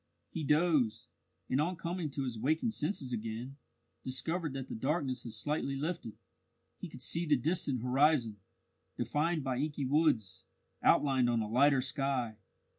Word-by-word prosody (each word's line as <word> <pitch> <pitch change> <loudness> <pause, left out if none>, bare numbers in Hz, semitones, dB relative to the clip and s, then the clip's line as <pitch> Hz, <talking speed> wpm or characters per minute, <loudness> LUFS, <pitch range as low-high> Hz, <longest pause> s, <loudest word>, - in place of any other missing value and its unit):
He 160 - -4
dozed, 145 -7 +2 0.4
and 130 +3 +1
on 175 +4 0
coming 170 -1 -3
to 140 0 -3
his 120 -4 -4
waking 155 - +1
senses 150 - -2
again, 115 +4 -4 0.5
discovered 160 +4 -1
that 135 -1 -5
the - - -6
darkness 135 +1 -1
had 115 - -7
slightly 140 +4 -1
lifted. 150 -5 -4 0.6
He - - -6
could - - -10
see 170 +1 0
the 150 - +5
distant 140 -3 0
horizon, 130 -4 +3 0.6
defined 155 +1 0
by 130 -2 -1
inky 145 0 -2
woods, 125 - +1 0.4
outlined 130 -4 +4
on 120 -1 +2
a - - -4
lighter 135 +4 +4
sky. 130 -4 -1
135 Hz, 150 wpm, -33 LUFS, 125-155 Hz, 0.6 s, the